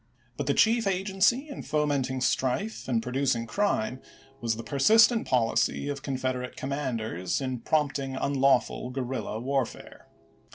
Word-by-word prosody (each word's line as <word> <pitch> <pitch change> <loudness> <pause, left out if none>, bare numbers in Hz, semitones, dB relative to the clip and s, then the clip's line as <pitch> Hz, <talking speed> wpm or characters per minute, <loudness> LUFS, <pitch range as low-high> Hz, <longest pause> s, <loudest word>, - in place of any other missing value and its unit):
But - - -4
the - - +2
chief 225 -1 +3
agency 195 +8 +1
in 285 - -7
fomenting 140 -4 -1
strife 135 - -1
and 115 -3 0
producing 125 -2 0
crime, 130 - -1 0.4
was 115 -3 -1
the 115 - -7
persistent 220 - +4
policy 125 +3 +1
of 140 -1 -4
Confederate 130 -2 -3
commanders 115 -10 -2
in 130 -2 -3
prompting 140 -1 -1
unlawful 135 -2 +1
guerrilla 125 -3 -4
warfare. 135 0 -3
135 Hz, 125 wpm, -27 LUFS, 125-150 Hz, 0.4 s, persistent